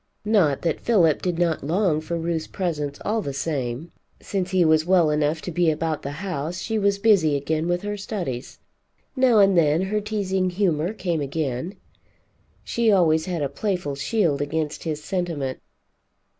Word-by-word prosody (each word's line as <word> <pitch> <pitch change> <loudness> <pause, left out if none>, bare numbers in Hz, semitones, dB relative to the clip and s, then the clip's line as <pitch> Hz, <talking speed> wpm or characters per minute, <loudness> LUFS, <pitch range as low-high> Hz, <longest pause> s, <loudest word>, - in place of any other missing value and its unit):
Not 190 -10 +2
that 165 -3 0
Philip 175 -10 +3
did 180 -2 -1
not 170 -4 0
long 165 0 +1
for 170 +2 -3
Ruth's 165 -1 -2
presence 150 -7 -3
all 220 +2 0
the 140 -7 -4
same. 140 +1 -3 0.3
Since 190 -2 -3
he 185 -2 +3
was 155 0 +4
well 175 -3 +3
enough 150 +1 0
to 180 - -4
be 175 0 +2
about 155 0 -1
the 140 - -5 0.2
house, 170 -1 -3
she 220 +2 -2
was 200 -1 +2
busy 200 -8 +4
again 155 +3 -1
with 175 +1 -1
her 205 0 -3
studies. 175 - -5 0.6
Now 255 -4 +4
and 195 -2 +5
then 155 -2 +4
her 210 +2 -1
teasing 195 -3 -1
humor 175 -2 0
came 175 -7 -2
again. 140 +4 -3 0.9
She 235 -2 +1
always 160 -5 +3
had 170 -5 -2
a - - +1
playful 175 0 -2
shield 145 +1 0
against 155 +2 -3
his 155 -2 -3
sentiment. 170 -8 -3
170 Hz, 170 wpm, -24 LUFS, 150-195 Hz, 0.9 s, and